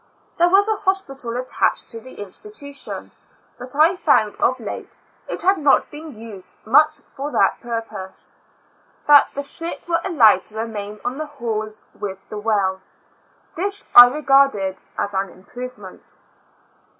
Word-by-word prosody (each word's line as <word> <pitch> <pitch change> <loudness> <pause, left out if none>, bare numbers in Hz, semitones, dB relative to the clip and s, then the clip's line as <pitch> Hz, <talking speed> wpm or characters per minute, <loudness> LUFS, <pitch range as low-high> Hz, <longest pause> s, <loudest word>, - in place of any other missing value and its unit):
There 345 +1 +5
was 395 +3 +4
a 435 -1 0
hospital 275 -12 -2
attached 255 0 0
to 230 - -7
the 260 +3 -13
institution, 285 - -7 0.5
but 255 +2 -4
I 320 +5 +5
found, 220 - +2
of 255 +1 +1
late, 220 - -7 0.3
it - - -4
had 380 0 +3
not 290 -2 +3
.been 305 0 -9
used 215 -4 -11
much 305 +7 +4
for 280 +2 -8
that - - +1
purpose; 225 -5 -5 0.7
that 290 -1 +7
the 285 - -2
sick 330 +5 -4
were 335 -1 +1
allowed 275 - +5
to 215 - -8
remain 210 -2 -5
on 255 +4 -3
the 310 - -4
halls 220 -6 -4
with 195 -2 -7
the 210 - -6
well. 200 -3 0 0.7
This 400 +4 -2
I 245 0 +12
regarded 270 -8 +2 0.2
an 195 -1 -1
improvement. 205 +2 -10
250 Hz, 140 wpm, -21 LUFS, 215-305 Hz, 0.7 s, I